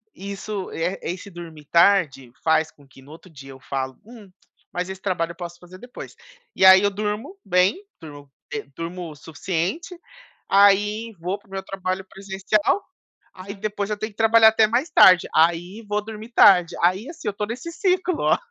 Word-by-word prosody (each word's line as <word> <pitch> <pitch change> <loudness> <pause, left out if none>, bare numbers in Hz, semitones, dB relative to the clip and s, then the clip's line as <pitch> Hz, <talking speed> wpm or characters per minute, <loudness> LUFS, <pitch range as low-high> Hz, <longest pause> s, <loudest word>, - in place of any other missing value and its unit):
isso, 200 +1 -6
e, - - -6
eh, 180 +3 -2
esse 185 +3 -6
dormir 165 -4 -11
tarde, 170 -8 +2
faz 160 0 +2
com 145 -1 -22
que 135 0 -18
no 140 +3 -16
outro 165 +4 -14
dia 135 -4 -13
eu 135 - -13
falo: 130 0 -5
"Hum, 220 -4 -14 0.4
mas 180 +1 -3
esse 190 0 -8
trabalho 170 -4 -2
eu - - -12
posso 175 0 -9
fazer 180 +1 -14
depois". 245 +4 -11 0.4
E 190 - +3
aí 190 0 +9
eu 205 - +2
durmo 210 - -4
bem, 185 - +2 0.2
durmo, 145 -3 -12 0.2
eh, 145 - -4
durmo 170 0 -6
o - - -12
suficiente, 185 - -4 0.5
aí 205 +3 +3
vou 180 +4 -3
pro 205 - -27
meu 195 0 -4
trabalho 190 0 -4
presencial, 200 - -1 0.5
aí 190 +2 -9
depois 205 0 -4
eu 210 - -1
tenho 215 +1 -5
que - - -34
trabalhar 225 0 +6
até 220 0 +4
mais 240 +8 -1
tarde, 185 -2 +6
aí 175 +6 +1
vou 210 0 -1
dormir 220 +1 -9
tarde, 180 -4 +6
aí, 185 +7 +2
assim, 330 - -7
eu - - -1
estou 205 +1 -4
nesse 250 +9 -6
ciclo, 365 -1 +1
190 Hz, 185 wpm, -22 LUFS, 170-210 Hz, 0.5 s, aí